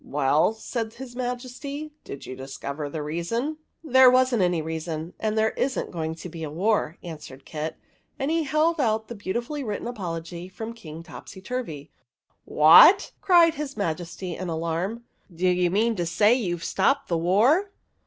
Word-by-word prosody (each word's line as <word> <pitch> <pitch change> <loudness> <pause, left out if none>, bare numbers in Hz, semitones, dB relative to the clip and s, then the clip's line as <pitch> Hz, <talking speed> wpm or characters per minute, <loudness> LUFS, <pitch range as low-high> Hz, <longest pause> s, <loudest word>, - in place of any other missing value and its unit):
"Well," 145 +7 +2
said 225 0 -5
his 250 -1 -9
Majesty, 255 +4 -5
"did 140 - -8
you 130 - -7
dis 135 +1 -8
cover 145 +1 -5
the 150 +1 -4
reason? 230 - -2
" - - -49
" - - -51
There 260 -4 +7
was 255 0 +3
n't 230 - +2
a 165 - -1
reason, 160 +1 -5
and 215 0 -1
there 220 0 +3
is 265 0 -1
n't - - -3
going 160 -2 -3
to 165 - -8
be 165 -1 -9
a 155 - -4
war," 180 0 0
answered 150 -5 -9
Kit; 155 0 -5 0.4
and 280 +2 -1
he 330 0 +2
held 310 +2 +1
out 220 -3 0
the - - -5
beautifully 235 +8 -3
written 210 -2 -4
apology 175 -5 -5
from 220 +4 -7
King 165 -8 -10
Topsyturvy. 185 - -7 0.5
"What!" 170 - +7
cried 340 -3 +5
his 295 -4 -6
Majesty, 175 -1 -3
in 185 0 -5
alarm. 170 +8 -2
" 175 - -23
Do 180 +3 +1
you 180 -1 +2
mean 220 +5 +1
to 175 -1 -1
say 210 +6 +4
you 190 -9 -1
've 165 - -11
stopped 275 +9 +1
the 170 - 0
war 235 - +3
195 Hz, 185 wpm, -25 LUFS, 165-250 Hz, 0.5 s, There